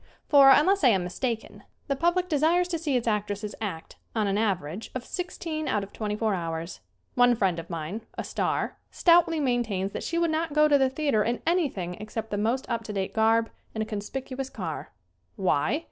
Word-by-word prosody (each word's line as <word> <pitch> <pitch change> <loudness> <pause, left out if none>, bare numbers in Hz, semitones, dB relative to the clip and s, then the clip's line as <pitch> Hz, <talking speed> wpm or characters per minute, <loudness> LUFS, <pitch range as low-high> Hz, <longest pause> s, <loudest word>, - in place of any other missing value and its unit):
For, 280 -2 +8
unless 350 +7 +5
I - - +7
am 195 -6 +3
mistaken, 225 +5 -4 0.2
the 275 - -1
public 345 +5 +1
desires 335 +3 +2
to 335 -2 -2
see 295 -5 +1
its 240 - -3
actresses 210 -1 -1
act 185 -7 -5 0.2
on 215 -2 +1
an 200 -1 0
average 195 -3 -1
of 255 -1 -4
sixteen 330 -4 -4
out 210 -6 0
of 195 - -10
twenty 210 -1 -3
four 215 -1 0
hours. 165 -1 -4 0.3
One 245 0 +5
friend 190 -6 +1
of 165 - -9
mine, 170 +5 -4 0.2
a - - -2
star, - - -2
stoutly 335 -2 +4
maintains 230 -8 0
that - - -5
she 335 - -2
would 335 -1 +2
not 320 -1 -1
go 300 0 +5
to 290 -1 +4
the 265 -1 +3
theater 270 -6 +1
in 235 +3 -1
anything 285 - 0
except 215 +1 -5
the 205 - -1
most 235 +5 0
up 235 -2 -2
to 210 - -5
date 195 -1 -2
garb 225 +1 +3 0.2
and 220 - 0
a - - -5
conspicuous 255 +5 -5
car! - - -6 0.4
Why? 190 - +1
230 Hz, 200 wpm, -27 LUFS, 205-295 Hz, 0.4 s, For